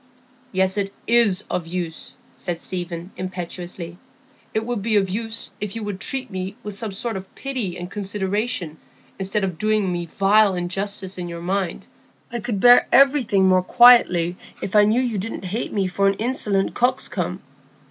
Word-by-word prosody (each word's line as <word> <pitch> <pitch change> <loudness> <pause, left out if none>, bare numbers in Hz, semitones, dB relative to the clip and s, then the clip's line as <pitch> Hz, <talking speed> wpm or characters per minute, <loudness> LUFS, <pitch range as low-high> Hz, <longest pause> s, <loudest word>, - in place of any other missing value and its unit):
"Yes, 190 +1 +1
it 195 -1 -1
is 225 -5 +4
of 170 -2 -3
use," 170 -2 -5 0.2
said 175 -3 -4
Stephen, 175 0 -5
impetuously. 180 -1 -6 0.5
"It 220 0 -1
would 240 -3 -2
be 220 +1 +1
of 195 -2 +2
use 225 +2 -3
if 210 -1 -4
you 225 - -4
would 205 -2 -4
treat 265 +3 -2
me 190 +1 -4
with 210 -1 -6
some 220 0 -5
sort 220 +3 -3
of 190 0 -10
pity 255 -10 -3
and 175 - -6
consideration, 200 -4 -2 0.4
instead 195 +2 0
of 185 -4 -3
doing 215 -3 +1
me 175 -1 -3
vile 200 +2 +3
injustice 190 +1 -3
in 175 -1 -4
your 170 0 -7
mind. 190 -1 -2 0.5
I 240 - -2
could 210 -2 -3
bear 245 +3 +7
everything 255 -8 +4
more 185 0 +4
quietly 180 -6 +5 0.2
if 195 - -5
I 210 0 +7
knew 220 +4 +3
you 235 -5 -1
didn't 205 0 -5
hate 210 +6 -3
me 200 -2 0
for 195 +2 +1
an 195 - +2
insolent 210 -4 0
coxcomb. 195 -8 -1
195 Hz, 170 wpm, -22 LUFS, 180-220 Hz, 0.5 s, bear